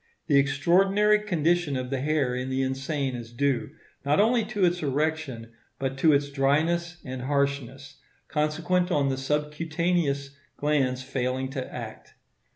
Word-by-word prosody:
The 140 Hz, -3 st, +4 dB
extraordinary 195 Hz, +9 st, +3 dB
condition 175 Hz, -6 st, +1 dB
of 130 Hz, 0 st, -4 dB
the 135 Hz, -2 st, -1 dB
hair 145 Hz, -3 st, +1 dB
in 125 Hz, +1 st, -3 dB
the 130 Hz, 0 st, 0 dB
insane 135 Hz, 0 st, -2 dB
is 115 Hz, -1 st, -8 dB
due, 140 Hz, +2 st, 0 dB, 0.3 s
not 145 Hz, +4 st, +2 dB
only 230 Hz, +2 st, +4 dB
to 210 Hz, -4 st, +1 dB
its 175 Hz, 0 st, +1 dB
erection, 145 Hz, -5 st, -2 dB, 0.3 s
but 135 Hz, -1 st, -2 dB
to 160 Hz, +2 st, +5 dB
its 140 Hz, 0 st, +1 dB
dryness 160 Hz, +5 st, +1 dB
and 130 Hz, -1 st, -5 dB
harshness, 140 Hz, 0 st, -2 dB, 0.3 s
consequent 160 Hz, +4 st, 0 dB
on 145 Hz, -5 st, +2 dB
the 135 Hz, -, -1 dB
subcutaneous 150 Hz, +1 st, -1 dB, 0.3 s
glands 135 Hz, -4 st, +1 dB
failing 130 Hz, 0 st, -2 dB
to 135 Hz, -2 st, -5 dB
act. -, -, -8 dB
140 Hz, 145 wpm, -26 LUFS, 135-165 Hz, 0.3 s, to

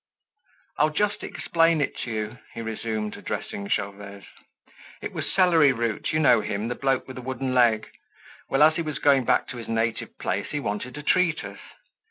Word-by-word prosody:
"I'll 150 Hz, -, +4 dB
just 205 Hz, +7 st, -1 dB
explain 165 Hz, -1 st, +2 dB
it 145 Hz, -, -1 dB
to -, -, -4 dB
you," 110 Hz, +2 st, -4 dB, 0.2 s
he 115 Hz, -, -4 dB
resumed, 110 Hz, -1 st, -3 dB
addressing 100 Hz, 0 st, -5 dB
Gervaise. 100 Hz, 0 st, -3 dB, 0.7 s
"It -, -, -6 dB
was -, -, -3 dB
Celery 165 Hz, -7 st, +5 dB
Root, 115 Hz, -3 st, -2 dB
you 155 Hz, -, +1 dB
know 125 Hz, -8 st, +5 dB
him, 105 Hz, +2 st, -3 dB
the -, -, -1 dB
bloke 135 Hz, 0 st, 0 dB
with 130 Hz, -1 st, -8 dB
a -, -, -7 dB
wooden 130 Hz, 0 st, -3 dB
leg. 120 Hz, -3 st, +3 dB, 0.6 s
Well, 135 Hz, +2 st, +4 dB
as 155 Hz, +1 st, +5 dB
he -, -, 0 dB
was 155 Hz, -4 st, -3 dB
going 140 Hz, -4 st, +4 dB
back -, -, +2 dB
to 125 Hz, -, -6 dB
his 115 Hz, -, -7 dB
native 115 Hz, 0 st, -2 dB
place, -, -, -2 dB
he 150 Hz, -, -2 dB
wanted 125 Hz, 0 st, -4 dB
to 150 Hz, -, -7 dB
treat 165 Hz, -2 st, +2 dB
us. 100 Hz, 0 st, -8 dB
125 Hz, 190 wpm, -25 LUFS, 110-150 Hz, 0.7 s, Celery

